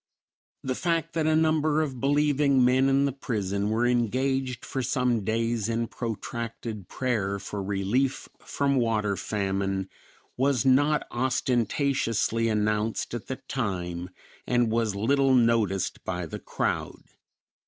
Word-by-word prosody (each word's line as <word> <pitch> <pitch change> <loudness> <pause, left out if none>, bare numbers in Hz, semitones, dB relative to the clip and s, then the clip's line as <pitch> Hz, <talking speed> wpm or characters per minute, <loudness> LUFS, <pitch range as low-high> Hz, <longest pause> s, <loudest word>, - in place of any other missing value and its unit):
The 130 - -1
fact 165 +2 -1
that 160 -1 0
a 155 - +3
number 155 -1 +2
of 135 -5 -5
believing 140 -1 +3
men 130 +2 +4
in 135 +1 +3
the 140 - +1
prison 100 -6 -2
were 115 +2 +1
engaged 125 +2 0
for 135 - -3
some 125 -2 +1
days 115 +1 0
in 115 0 0
protracted 115 -2 -5
prayer 105 -6 -1
for 100 +1 -5
relief 100 +7 0
from 140 -1 0
water 110 -4 +1
famine 95 -1 -2 0.5
was 135 -2 +1
not 145 +3 +3
ostentatiously 120 -2 0
announced 105 +1 0
at 120 - -5
the 130 - -3
time, 90 -7 -3 0.4
and 120 -2 +2
was 115 -3 0
little 135 +5 +3
noticed 115 -6 +1
by 90 -1 -3
the 80 - -7
crowd. - - -3
120 Hz, 130 wpm, -27 LUFS, 105-135 Hz, 0.5 s, men